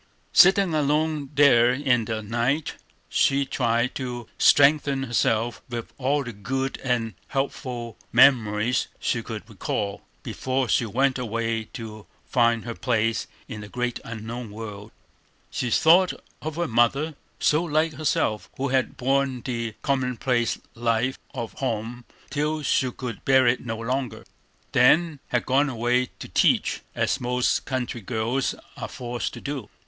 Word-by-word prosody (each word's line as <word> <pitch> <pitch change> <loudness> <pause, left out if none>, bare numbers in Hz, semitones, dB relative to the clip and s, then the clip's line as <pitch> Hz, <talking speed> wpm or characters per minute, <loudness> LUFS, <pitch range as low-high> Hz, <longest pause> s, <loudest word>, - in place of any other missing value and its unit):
Sitting 190 -1 +6
alone 150 -1 +1
there 125 -4 +6
in 125 -3 +1
the 110 -1 -3
night, 120 +8 0 0.3
she 140 0 +2
tried 120 -2 0
to 125 -3 -5
strengthen 140 -1 +5
herself 115 -2 0
with 120 -2 -6
all 140 +2 +1
the 120 -2 -7
good 135 +6 -3
and 120 -4 0
helpful 125 -4 -3
memories 115 -2 +4
she - - 0
could - - -7
recall, 100 -1 -3 0.2
before 130 0 -1
she 115 +3 +2
went 130 +4 +1
away 115 -1 -2
to 110 -4 -8 0.2
find 115 -2 +2
her 115 - -4
place 115 -2 0 0.2
in 105 - -7
the 105 - -8
great 125 0 -2
unknown 115 +1 -6
world. 105 -1 -8 0.6
She 125 - -2
thought 175 +8 +5 0.3
of 155 0 -4
her 170 0 -1
mother, 130 +7 +2 0.3
so 155 +3 +3
like 155 -1 +1
herself, 130 -7 -1
who 140 +1 -1
had 130 0 0
borne 135 -1 +1
the 115 -3 -3
commonplace 125 -3 0 0.2
life 120 +2 0 0.2
of 120 -3 -4
home 120 -1 -3 0.3
till 150 +1 -1
she 130 -1 +2
could 125 -2 -7
bear 130 -1 +5
it 120 +1 +2
no 115 -2 -4
longer. 125 +2 -3 0.5
Then 155 +5 +4
had 120 - 0
gone 140 +3 +3
away 125 +1 +1
to - - -8
teach, - - +2
as 135 - 0
most 125 0 +1
country 125 -3 -3
girls 120 +4 -1 0.2
are - - -5
forced 120 -1 -4
to - - -9
do. 140 -7 -5
125 Hz, 145 wpm, -25 LUFS, 115-140 Hz, 0.6 s, Sitting